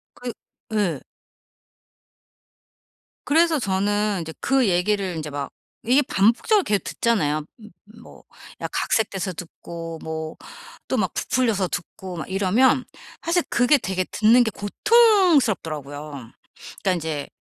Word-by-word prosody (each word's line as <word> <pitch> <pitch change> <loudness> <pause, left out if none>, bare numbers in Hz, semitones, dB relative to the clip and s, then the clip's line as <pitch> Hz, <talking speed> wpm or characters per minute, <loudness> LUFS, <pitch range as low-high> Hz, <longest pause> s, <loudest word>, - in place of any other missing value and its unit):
그 245 0 -5 0.4
예. 185 -10 0 2.3
그래서 325 +1 +3
저는 205 -1 0
인제 160 -1 -6
그 270 -3 +2
얘기를 185 +1 0
인제 155 -2 -5
막 140 -1 -4 0.4
이게 270 +3 +6
반복적으로 250 - +3
계속 205 - 0
듣잖아요. 155 -10 0 0.2
음 215 -1 -13 0.3
뭐 - - -15 0.4
약간 - - -3
각색돼서 195 -4 0
듣고 165 -1 -8
뭐 160 0 -5 0.5
또 - - -1
막 - - 0
부풀려서 225 -7 +1
듣고 180 +1 -6
막 155 - -6
이러면 210 +7 +3 0.4
사실 345 +2 +2
그게 245 +5 +4
되게 190 -5 -1
듣는 230 +4 +5
게 220 - -2
고통스럽더라고요. 215 - +2 0.7
그러니까 190 - +2
인제 160 -4 -4
200 Hz, 260 characters per minute, -23 LUFS, 170-250 Hz, 2.3 s, 이게